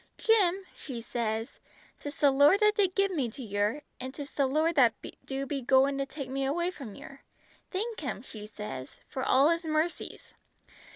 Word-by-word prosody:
'Jim,' 390 -4 +3
she 255 -5 -7
sez, 225 -1 -3 0.4
''tis 290 0 -6
the 285 -2 +5
Lord 285 +8 +6
that 425 0 +5
did 390 -3 +2
give 395 0 +3
me 280 -9 0
to 260 +4 -9
yer, 210 +6 -1 0.2
an' 260 +1 -5
'tis 285 +1 -8
the 280 -2 +1
Lord 310 +5 +2
that 250 -7 +5 0.3
do 270 0 -3
be 275 0 -3
goin' 270 +2 +3
to 275 - -1
take 275 -1 -6
me 270 0 -1
away 340 +6 0
from 250 - -9
yer. 275 0 -11 0.5
Thank 435 +4 -3
Him,' 260 -6 -4
she 215 -5 -9
sez, 210 -12 -7
'for 260 - -4
all 270 +4 +5
His 335 +1 0
mercies!' 315 +2 -2
275 Hz, 185 wpm, -29 LUFS, 255-335 Hz, 0.5 s, Lord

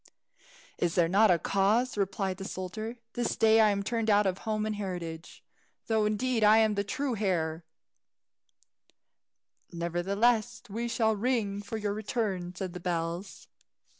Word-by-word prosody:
"Is 170 -2 0
there 170 -2 +4
not 205 +5 +4
a 175 - +5
cause?" 205 +8 +1
replied 195 -2 -1
the 195 - -7
soldier. 215 +5 -5 0.2
"This 240 - -1
day 225 0 +5
I 215 - +5
am 200 -1 0
turned 225 +1 -1
out 205 0 +4
of 190 -1 0
home 215 -1 -2
and 215 -1 -2
heritage, 175 -5 -6 0.4
though 220 -2 +1
indeed 225 +2 0
I 210 +1 +7
am 220 -1 +4
the 200 0 0
true 255 +5 -2
heir." 170 -5 -1 2.1
"Nevertheless 200 +8 0
we 230 +3 -2
shall 225 -2 +1
ring 210 -3 -1
for 205 +2 -5
your 205 -1 -2
return," 205 -5 -3
said 185 -1 -5
the 180 - -6
bells. 170 +1 -4
205 Hz, 150 wpm, -29 LUFS, 185-220 Hz, 2.1 s, I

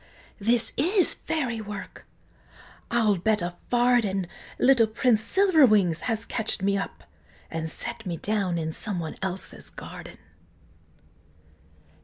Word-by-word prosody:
this 230 +3 +3
is 370 +3 +5
Fairy 250 -8 -3
work! 205 -1 -9 0.8
I'll 220 -4 +2
bet 210 +2 +1
a 175 0 -3 0.2
farden, 240 -6 +2 0.3
Little 250 -4 +4
Prince 220 0 +2
Silverwings 230 - +4
has 225 0 -2
ketch'd 220 -4 -3
me 200 0 +2
up, 195 - -5 0.5
And 160 0 -3
set 235 +7 -6
me 170 -2 -3
down 195 -2 -1
in 160 -1 -2
some 200 -1 -3
one 160 -2 -5
else's 190 0 -5
garden!" - - -10
215 Hz, 120 wpm, -26 LUFS, 190-240 Hz, 0.8 s, is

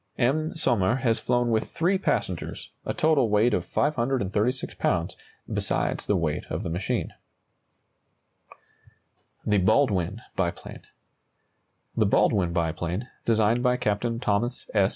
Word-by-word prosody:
M. 155 +7 +1
Sommer 120 - +2
has 125 -4 +1
flown 120 -1 +1
with 110 -1 0
three 180 +3 +1
passengers, 90 - -2 0.2
a - - +1
total 155 -7 +3
weight 105 +4 +3
of - - -1
536 125 -3 0
lbs., 85 +1 -1 0.4
besides - - -1
the 105 - +2
weight 80 -4 -1
of - - -3
the 80 - -3
machine. 90 +3 -2 2.3
THE 105 -1 +3
BALDWIN 105 -1 +2
BIPLANE. 90 -3 -4 1.1
The - - +3
Baldwin 90 -4 +3
biplane, 85 +6 -2 0.2
designed 110 +1 +3
by 125 0 +2
Captain 115 0 -1
Thomas 120 +2 -1
S. 100 -3 +4
110 Hz, 120 wpm, -26 LUFS, 95-125 Hz, 2.3 s, S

